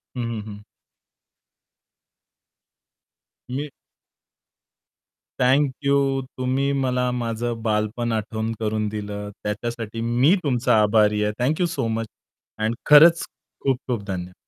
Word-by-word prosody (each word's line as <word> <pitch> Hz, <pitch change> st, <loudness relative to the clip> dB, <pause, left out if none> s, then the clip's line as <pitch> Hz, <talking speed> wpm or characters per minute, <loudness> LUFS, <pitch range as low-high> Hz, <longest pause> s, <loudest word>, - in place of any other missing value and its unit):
हं, 125 Hz, -, -3 dB
हं, 115 Hz, -2 st, -4 dB
हं 105 Hz, -1 st, -9 dB, 2.9 s
मी 145 Hz, +3 st, -3 dB, 1.7 s
थँक 135 Hz, +2 st, +3 dB
यू, 140 Hz, -1 st, +2 dB, 0.2 s
तुम्ही 130 Hz, +2 st, 0 dB
मला 125 Hz, -2 st, 0 dB
माझं 120 Hz, -1 st, -3 dB
बालपण 110 Hz, +2 st, -1 dB
आठवण 110 Hz, +1 st, -2 dB
करून 110 Hz, -1 st, -1 dB
दिलं. 105 Hz, -1 st, -5 dB
त्याच्यासाठी 115 Hz, +1 st, -4 dB
मी 125 Hz, +10 st, +3 dB
तुमचा 125 Hz, -6 st, +2 dB
आभारी 105 Hz, 0 st, +3 dB
आहे. 105 Hz, -, +1 dB
थँक 135 Hz, +6 st, +1 dB
यू -, -, +4 dB
सो 115 Hz, -, -1 dB
मच 115 Hz, 0 st, -3 dB, 0.5 s
आणि 110 Hz, +1 st, 0 dB, 0.2 s
खरंच 165 Hz, +3 st, +8 dB, 0.4 s
खूप-खूप 125 Hz, -4 st, -1 dB
धन्यवाद. 90 Hz, -2 st, -5 dB
115 Hz, 110 wpm, -23 LUFS, 105-130 Hz, 2.9 s, खरंच